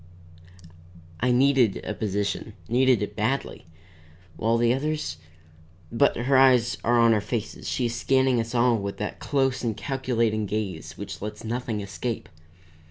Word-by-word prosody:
I 125 - +1
needed 125 -4 +3
a 110 - -3
position, 105 0 -2
needed 125 -2 +3
it 105 0 -5
badly, 115 -3 -2 0.7
while 115 +1 +1
the 120 0 +3
others 145 - -2 0.7
But 130 +5 +2
her 130 +3 +1
eyes 125 -3 +4
are 120 +1 +3
on 115 -1 +5
our 105 - +1
faces, 110 +1 -4
she 125 - 0
is 115 - -1
scanning 130 +1 +2
us 115 +2 -3
all 120 -1 +3
with 100 0 -5
that 105 - -4
close 135 -3 0
and 115 -3 -1
calculating 115 -6 -1
gaze 100 -6 -4
which - - -7
lets 105 +1 -6
nothing 115 -2 -3
escape. 100 +4 -5
115 Hz, 150 wpm, -25 LUFS, 105-130 Hz, 0.7 s, on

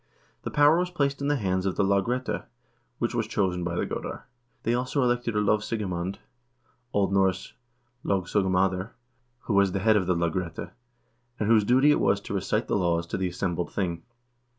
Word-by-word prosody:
The - - -4
power 150 +3 +5
was 180 0 0
placed 140 -5 -1
in 140 - -1
the 145 - +2
hands 95 -5 0
of 95 - -1
the 100 - +2
lagrette, 100 +6 0 0.5
which - - -1
was - - -1
chosen 90 -3 0
by 85 0 -2
the - - 0
goder. - - -5 0.4
They 115 - +1
also 125 +3 0
elected 120 -2 0
a - - +3
lov 105 +1 +3
sigemand 95 -4 -3 0.7
(O. 100 -1 +2
N. - - -4 0.9
logsogumtidr), 95 0 +1 0.5
who 110 - -3
was 100 -1 +3
the 95 - 0
head 110 +2 +4
of 95 -3 0
the 90 - +2
lagrette, 85 +1 -2 0.7
and 105 - 0
whose 110 -1 +5
duty 130 +7 +5
it - - +3
was 100 - +2
to - - -6
recite 100 +4 -1
the - - 0
laws 85 -3 +1
to - - -4
the 95 -1 0
assembled 90 -1 -2
thing. 85 -4 -2
100 Hz, 185 wpm, -26 LUFS, 90-120 Hz, 0.9 s, power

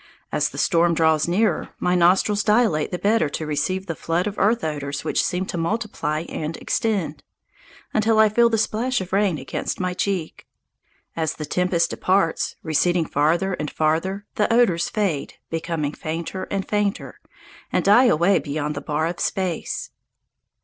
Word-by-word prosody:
As - - +1
the - - -11
storm 170 -2 +3
draws 160 -1 +3
nearer, 205 +6 +1
my 180 - 0
nostrils 185 +4 +3
dilate 210 -8 +2
the 180 - -3
better 205 -3 +2
to 155 - -4
receive 155 +6 -1
the 170 - -3
flood 165 +3 -1
of 210 - -3
earth 225 +4 +2
odours 145 -2 -3
which - - +1
seem 180 +1 -1
to 175 - -4
multiply 165 -5 -2
and 160 -1 -5
extend, 210 -7 -1 0.7
until 220 +1 +2
I 220 0 +7
feel 235 +3 +4
the 225 - +1
splash 230 +4 0
of 185 -1 -7
rain 195 -4 +2
against 135 - -4
my 180 -1 -1
cheek. 180 -3 -3 0.7
As 160 -2 -1
the 150 - -5
tempest 180 +2 +1
departs, 185 -3 +1
receding 170 +2 +1
farther 165 +7 +1
and 150 -4 -3
farther, 165 +6 -1
the 210 - +2
odours 230 -8 +3
fade, 190 -10 -2 0.2
become 165 -2 -2
fainter 165 +5 -5
and 195 -1 -2
fainter, 205 -1 -2 0.5
and - - 0
die 215 +6 +6
away 180 -3 +4
beyond 145 +1 -3
the 140 - -5
bar 150 +2 -1
of 170 +1 -3
space. 185 -4 -2
180 Hz, 165 wpm, -22 LUFS, 155-205 Hz, 0.7 s, I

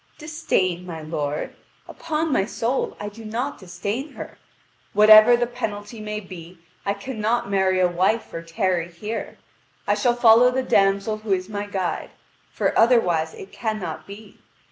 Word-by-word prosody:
"Disdain, 245 - -1
my 165 -3 -7
lord? 150 -2 -3 0.3
Upon 320 -2 -2
my 195 - +3
soul, 235 +4 -2
I 205 - -5
do 215 +2 -10
not 240 +6 -4
disdain 200 - -5
her. - - -9 0.5
Whatever 215 +3 +8
the 240 - +1
penalty 225 -2 -6
may 210 0 -4
be, 180 -3 -11 0.3
I 200 - +1
cannot 225 0 -2
marry 190 -1 +2
a 180 - +4
wife 185 +6 0
or 165 - -4
tarry 175 0 -1
here. 210 +6 -6 0.5
I - - +2
shall 245 -2 +1
follow 240 +1 +6
the 260 +1 -1
damsel 200 0 +2
who 215 -2 -1
is 185 +1 -2
my 205 -1 -4
guide: 190 -3 -3 0.4
for - - -1
otherwise 180 -10 +3
it 190 - -11
cannot 215 -8 -4
be. 205 +1 -12
205 Hz, 155 wpm, -23 LUFS, 185-235 Hz, 0.5 s, Whatever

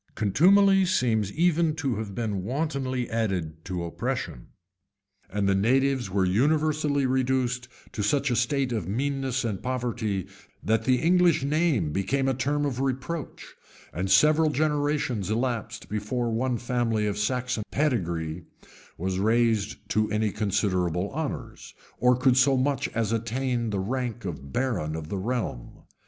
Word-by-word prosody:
Contumely 195 - +5
seems 115 - +1
even 165 -1 +2
co 145 -5 -1
have 105 -3 -5
been 105 -4 -2
wantonly 130 - -2
added 90 -8 -2
to 90 -2 -4
oppression;[*] 80 -6 -4 0.8
and 100 0 -1
the 100 - +3
natives 130 +3 +2
were 95 0 +1
universally 150 +6 +2
reduced 130 -1 0 0.2
to 105 - -4
such 130 +6 +1
a - - +2
state 130 +2 +1
of 110 -8 -2
meanness 135 +3 -1
and 105 -5 -3
poverty, 120 -6 -2 0.4
that 110 +1 +1
the 130 - +4
English, 170 +1 +3
name 140 - +1
became 130 - 0
a 135 - +2
term 145 +3 0
of 130 -3 -2
reproach; 135 +4 -4 0.4
and 90 +4 -2
several 155 +11 +5
generations 145 - 0
elapsed 115 0 -2
before 115 +3 -2
one 125 +2 0
family 120 -2 0
of 105 -1 -1
Saxon 120 +2 -1
pedigree 85 - -1 0.5
was 95 +2 -2
raised 110 0 +1
to 110 0 +1
any 105 0 +1
considerable 95 -4 0
honors, 155 0 -5 0.2
or 125 +1 +4
could 125 0 +3
so 130 +1 +4
much 135 +1 0
as 115 -2 0
attain 120 +1 -1
the 100 -2 -1
rank 120 +2 -3
of 75 -6 -6
baron 90 - -1
of 80 -1 -6
the 100 - -3
realm. 110 - -4
120 Hz, 145 wpm, -26 LUFS, 100-135 Hz, 0.8 s, Contumely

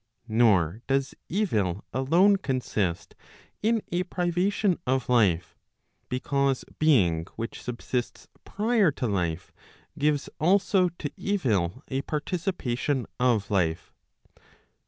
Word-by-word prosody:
Nor 110 -5 +3
does 135 0 0 0.2
evil 105 - 0
alone 170 - +4
consist 115 - -2 0.5
in 225 0 +1
a 175 +1 +1
privation 180 +2 0
of 130 -1 +1
life, 100 -9 +2 0.5
because 135 +1 0
being 95 - +3
which 115 +1 -5
subsists 125 0 -4 0.2
prior 215 -2 +2
to 130 - -3
life, 90 -5 -2 0.5
gives 145 -1 +1
also 185 +2 +3
to 145 - -4
evil 125 - 0
a 135 0 -2
participation 145 -5 -2
of 120 -5 +1
life. 85 -4 0
130 Hz, 100 wpm, -27 LUFS, 105-175 Hz, 0.5 s, alone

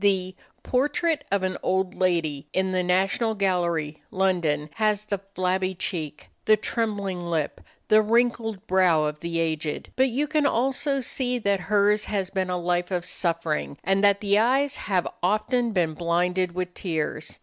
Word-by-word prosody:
The 185 -2 +1 0.3
"Portrait 295 +4 +1
of 200 -1 +1
an 185 0 -2
Old 190 0 0
Lady," 160 -6 0
in 190 0 +1
the 185 -1 +1
National 190 +5 +1
Gallery, 170 -6 0
London, 170 -6 0
has 215 -1 +1
the 200 -2 -2 0.2
flabby 185 +1 0
cheek, 155 -5 -4 0.2
the 215 0 +5
trembling 205 -4 -2
lip, 165 -4 -2 0.3
the 215 0 +6
wrinkled 225 -2 +1
brow 180 -5 +3
of 150 0 -2
the 170 0 -3
aged; 155 -2 -2
but 260 0 +3
you 270 +5 0
can 300 -1 +2
also 270 +3 0
see 250 0 -2
that 200 -4 +1
hers 210 0 +3
has 195 -3 -2
been 185 -1 -1
a 180 - 0
life 175 0 0
of 180 -2 -2
suffering, 165 -5 -2
and 195 +2 +1
that 200 0 +4
the 205 0 +3
eyes 270 +5 +2
have 185 -3 -1
often 230 +6 +1
been 175 -6 +1
blinded 175 +2 0
with 180 -1 -3
tears. 155 -4 -3
190 Hz, 160 wpm, -25 LUFS, 175-215 Hz, 0.3 s, the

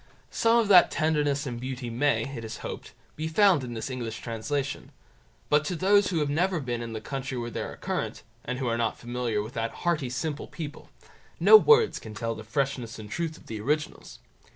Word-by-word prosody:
Some 230 +1 +3
of 230 -3 +3
that 180 -3 +8
tenderness 150 -2 +1
and 120 -3 -5
beauty 125 -2 -5
may, 140 +5 +2
it 115 - -6
is 110 - -6
hoped, - - -7 0.2
be 155 +1 -3
found 180 -3 +4
in 120 -2 -6
this 115 +4 -4
English 115 -3 -4
translation; 135 +5 -3 0.6
but 150 0 +3
to 180 - -2
those 200 +3 +4
who 180 - -1
have 150 - +1
never 175 +3 +1
been 120 -4 -3
in 115 -1 -5
the 110 - -4
country 135 +1 -4
where 120 0 -4
they - - -4
are - - -5
current, - - -3 0.2
and 125 +1 -3
who 130 - -3
are 115 0 0
not 115 -1 0
familiar 120 -3 -2
with 110 +4 -9
that 115 -2 -1 0.2
hearty 160 -7 +1
simple 145 +4 -3
people, 150 -3 -8 0.5
no - - +8
words 450 +1 +6
can 110 -1 -10
tell 115 +1 -2
the 110 - -8
freshness 130 0 -2
and 105 -1 -10
truth 165 -2 -3
of - - -18
the 110 -2 -6
originals. 150 +6 -2
135 Hz, 210 wpm, -27 LUFS, 115-160 Hz, 0.6 s, that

